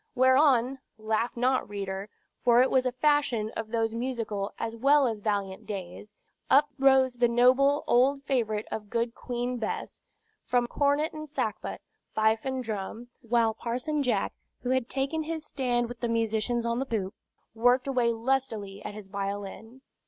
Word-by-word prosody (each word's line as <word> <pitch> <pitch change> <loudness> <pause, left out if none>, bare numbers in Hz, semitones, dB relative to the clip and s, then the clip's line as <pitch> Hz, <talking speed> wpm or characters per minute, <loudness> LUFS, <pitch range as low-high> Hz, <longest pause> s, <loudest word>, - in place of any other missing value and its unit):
Whereon 260 0 +4 0.2
(laugh 220 +2 -1
not, 255 -1 +1
reader, 195 0 -4 0.3
for 240 0 +6
it 260 - 0
was 260 -1 +3
a - - 0
fashion 255 -5 +1
of 225 - -3
those 225 0 -1
musical 230 -5 -3
as 225 - -4
well 275 +4 +4
as 220 -3 -2
valiant 200 -2 -2
days) 195 0 -7 0.4
up 290 +2 +5
rose 265 -1 +5
that 240 -1 +2
noble 260 +4 +4
old 275 +3 +3
favorite 220 -6 0
of 210 -2 -5
good 230 +1 -1
Queen 245 0 -3
Bess, 220 -2 -4 0.4
from 245 -1 +1
cornet 285 +4 +1
and 310 -1 -7
sackbut, 250 -8 -3 0.3
fife 220 +1 +2
and 260 -1 -2
drum; 220 +2 -5
while 230 -1 +2
Parson 250 +7 -2
Jack, 235 -7 0 0.3
who 250 - -2
had 260 -2 0
taken 275 +4 -1
his 315 0 -4
stand 245 -4 0
with 240 0 -9
the 235 - -2
musicians 230 +1 0
on 235 +1 0
the 270 - -1
poop, 200 -5 -2 0.4
worked 245 +3 +3
away 250 -4 +2
lustily 225 -5 -2
at 205 - -6
his 210 -2 -9
violin. 200 +5 -5
240 Hz, 160 wpm, -28 LUFS, 220-265 Hz, 0.4 s, for